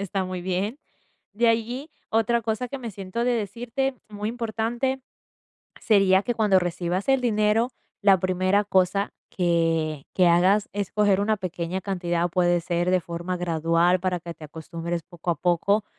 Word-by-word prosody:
está 195 -1 -2
muy 185 -1 -5
bien. 190 +8 -2 0.6
De 235 +2 +3
allí, 240 +7 -1 0.2
otra 225 +1 +2
cosa 225 +3 -2
que 275 - -5
me 235 -3 -6
siento 195 +4 -4
de 250 - +2
decirte 240 +5 -2
muy 210 0 -4
importante 235 +3 -2 0.8
sería 195 -3 +4
que 240 - -1
cuando 210 -4 +4
recibas 180 +2 -2
el 270 -1 +4
dinero, 225 +1 +2 0.3
la 195 -2 +5
primera 185 +2 +2
cosa 190 +1 +1 0.2
que 165 -4 0
que 180 -2 +4
hagas 185 +5 +4
es 200 -2 -3
coger 205 -2 +3
una 215 +1 +1
pequeña 180 0 -3
cantidad, 175 -3 -1
puede 175 0 +2
ser 175 +1 0
de 185 - +4
forma 175 +2 -4
gradual, 170 +1 +2
para 180 -2 0
que 170 0 -7
te 155 - -14
acostumbres 165 +2 -5
poco 175 +1 -4
a - - 0
poco, 180 +6 +1
190 Hz, 160 wpm, -25 LUFS, 175-220 Hz, 0.8 s, la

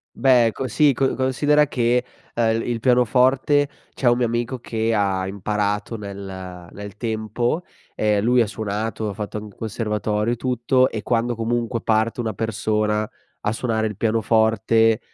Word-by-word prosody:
Beh, 125 -2 +5
ecco 130 +4 -3
sì, 145 +5 +4
co 135 +1 0
considera 145 +3 +2
che, 120 -2 +1 0.3
ehm, 115 -1 +1
il 120 -2 -3
pianoforte, 130 +4 +3 0.2
c'è 125 - +2
un 120 - +3
mio 125 - +2
amico 120 +2 -2
che 115 -1 -1
ha 100 -3 +1
imparato 105 +3 -2
nel 95 -4 -8
nel 100 0 -9
tempo, 115 - -2 0.3
ehm, 105 -1 +1
lui 120 +3 +4
ha 115 - +2
suonato, 110 +1 -3
ha 105 - -3
fatto 105 +1 -5
anc 105 - -6
un - - -28
conservatorio 105 0 -1
e - - -2
tutto, 130 +1 +1
e 110 - -4
quando 120 +2 0
comunque 115 +1 -1
parte 110 +2 +1
una 115 -2 -2
persona 105 0 -1 0.3
a - - +1
suonare 110 -2 -1
il 105 - -6
pianoforte, 110 +1 +2
115 Hz, 160 wpm, -22 LUFS, 105-120 Hz, 0.3 s, Beh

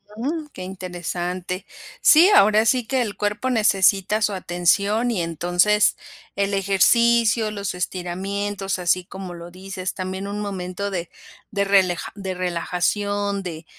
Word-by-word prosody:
Ujú, 295 +6 -3
que 185 - -8
interesante. 180 0 -5 0.4
Sí, 340 +1 +7
ahora 215 +2 +5
sí 245 +1 +2
que 260 +2 0
el 215 -4 -3
cuerpo 210 +5 -2
necesita 205 -2 +3
su 210 -1 +1
atención. 200 +6 +1
Y 190 -6 -1
entonces, 175 +5 +2 0.4
el 200 0 0
ejercicio, 220 +3 +3
los 200 -3 -4
estiramientos, 195 +2 -3
así 180 0 +1
como 190 -2 -8
lo 170 0 -9
dices, 185 0 -6
también 190 +1 -5
un 205 +1 -4
momento 195 0 -4
de 175 -2 -4 0.4
de 200 -2 0
releja 190 -3 +2
de 190 -2 -4
relajación, 195 +3 -1
de 165 -2 -7
195 Hz, 135 wpm, -22 LUFS, 180-210 Hz, 0.4 s, Sí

